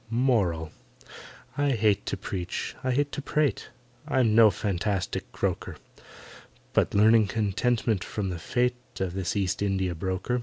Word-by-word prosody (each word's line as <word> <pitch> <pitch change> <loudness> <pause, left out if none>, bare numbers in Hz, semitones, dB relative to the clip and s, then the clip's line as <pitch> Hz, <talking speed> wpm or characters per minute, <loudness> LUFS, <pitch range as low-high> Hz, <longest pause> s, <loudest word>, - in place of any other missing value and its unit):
MORAL. 105 - +1 0.9
I 145 -1 +2
hate 105 -3 +1
to - - -2
preach—I 95 +7 -4
hate 140 +3 +1
to - - -4
prate— 150 0 0 0.4
I'm 120 -5 +2
no 110 -1 +8
fanatic 100 -1 -2
croaker, - - -2 1.0
But - - +2
learn 110 +1 +5
contentment 110 +1 0
from 100 -3 -3
the 85 - -5
fate 125 +6 -2
Of 95 -2 -2
this 95 0 -2
East 100 -1 -1
India 95 -3 0
broker. 95 +8 -2
105 Hz, 130 wpm, -27 LUFS, 95-125 Hz, 1.0 s, no